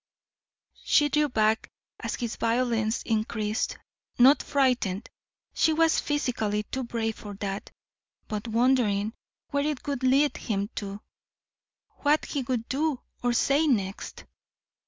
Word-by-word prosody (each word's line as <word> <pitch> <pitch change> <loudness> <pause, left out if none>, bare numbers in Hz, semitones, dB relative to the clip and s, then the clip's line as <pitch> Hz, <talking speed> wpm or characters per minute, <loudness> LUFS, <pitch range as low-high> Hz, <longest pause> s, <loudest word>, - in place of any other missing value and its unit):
She 295 0 +4
drew 300 0 +2
back 220 -2 +1 0.3
as - - -3
his 235 -3 -3
violence 230 -1 0
increased; 215 -1 -1 0.4
not 265 +4 +7
frightened 250 -8 +1 0.5
she 320 - +3
was 325 0 +3
physically 230 -8 -1
too 260 +5 -4
brave 225 -2 -2
for 205 -1 -8
that; 195 0 -4 0.6
but 215 +1 -4
wondering 225 -3 +2 0.4
where 285 -1 +1
it 300 -4 -3
would 280 -3 -2
lead 270 +2 +3
him 205 -1 -2
to, 200 0 -5 1.0
what 295 +1 +2
he 285 - -2
would 240 -2 -2
do 290 0 0 0.2
or 245 0 +1
say 280 +5 +3
next. 200 -7 -2
240 Hz, 125 wpm, -27 LUFS, 215-280 Hz, 1.0 s, not